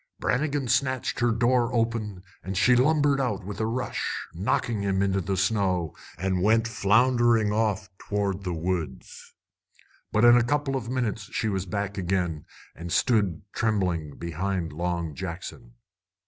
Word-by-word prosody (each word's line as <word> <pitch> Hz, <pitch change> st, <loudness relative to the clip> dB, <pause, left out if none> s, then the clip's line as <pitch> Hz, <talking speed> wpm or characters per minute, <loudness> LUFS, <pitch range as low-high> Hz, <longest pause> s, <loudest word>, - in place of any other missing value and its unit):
Brannigan 140 Hz, 0 st, 0 dB
snatched 130 Hz, +1 st, 0 dB
her 120 Hz, -1 st, +3 dB
door 120 Hz, +1 st, +2 dB
open, 115 Hz, -5 st, -1 dB, 0.2 s
and 95 Hz, 0 st, -5 dB
she 125 Hz, +5 st, +5 dB
lumbered 145 Hz, +1 st, +3 dB
out 105 Hz, -7 st, -2 dB
with 100 Hz, +1 st, -6 dB
a 110 Hz, -, 0 dB
rush, 125 Hz, +3 st, -3 dB
knocking 100 Hz, +4 st, -1 dB
him 100 Hz, -1 st, +1 dB
into 95 Hz, 0 st, +1 dB
the 95 Hz, +2 st, -2 dB
snow, 95 Hz, -4 st, +1 dB, 0.2 s
and 95 Hz, +1 st, -1 dB
went 110 Hz, +3 st, +3 dB
floundering 115 Hz, 0 st, +3 dB
off 105 Hz, -2 st, 0 dB
toward 100 Hz, -2 st, -2 dB
the 90 Hz, -, -2 dB
woods. 85 Hz, 0 st, -4 dB, 0.8 s
But 110 Hz, +2 st, +3 dB
in 120 Hz, 0 st, +8 dB
a 120 Hz, -, +5 dB
couple 145 Hz, +2 st, 0 dB
of 120 Hz, -3 st, -3 dB
minutes 115 Hz, -5 st, -2 dB
she 110 Hz, -, -1 dB
was 95 Hz, -1 st, -2 dB
back 100 Hz, +2 st, -3 dB
again 90 Hz, -4 st, -1 dB, 0.3 s
and 85 Hz, +1 st, -7 dB
stood 100 Hz, -5 st, +2 dB
trembling 90 Hz, -9 st, -1 dB
behind 85 Hz, 0 st, -3 dB
Long 85 Hz, -1 st, -2 dB
Jackson. 95 Hz, -, -7 dB
105 Hz, 145 wpm, -26 LUFS, 95-120 Hz, 0.8 s, in